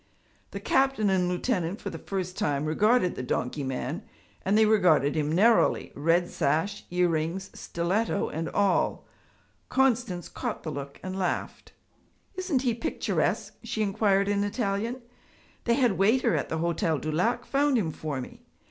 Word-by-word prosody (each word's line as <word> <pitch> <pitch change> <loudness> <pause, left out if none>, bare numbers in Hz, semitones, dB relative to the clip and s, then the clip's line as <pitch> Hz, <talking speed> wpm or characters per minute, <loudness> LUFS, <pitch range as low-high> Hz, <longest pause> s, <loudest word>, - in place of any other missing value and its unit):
The - - -6
captain 265 -7 +2
and 180 -2 +2
lieutenant 180 -1 -1
for - - -5
the - - -7
first 185 -2 -4
time 145 0 0
regarded 205 +5 +3
the - - -5
donkey 125 +3 -2
man, 130 +3 -3 0.4
and 200 +3 +2
they 220 - +6
regarded 180 -10 +4
him 150 -1 0
narrowly, 220 +7 +3
red 165 +4 +2
sash, 160 +8 -1
earrings, 175 +1 0
stiletto 195 +5 -1
and 160 +1 -3
all. 200 -2 +1 0.6
Constance 245 -9 +1
caught - - -5
the 155 - -4
look 140 -1 -7
and 185 +1 -4
laughed. 180 -2 -3 0.6
'Isn't 360 -8 0
he 245 -3 +2
picturesque?' 280 +8 -1
she 220 - -2
inquired 200 -1 +2
in 200 0 +1
Italian. 220 +3 -2 0.6
'The 235 - +3
head 250 -3 +3
waiter 230 +4 +3
at - - -2
the 160 - -2
Hotel 165 -1 0
du 155 +2 -3
Lac 180 +10 0
found 280 -1 +2
him 175 -8 0
for 150 -3 -4
me. 125 - -9
190 Hz, 155 wpm, -27 LUFS, 160-225 Hz, 0.6 s, they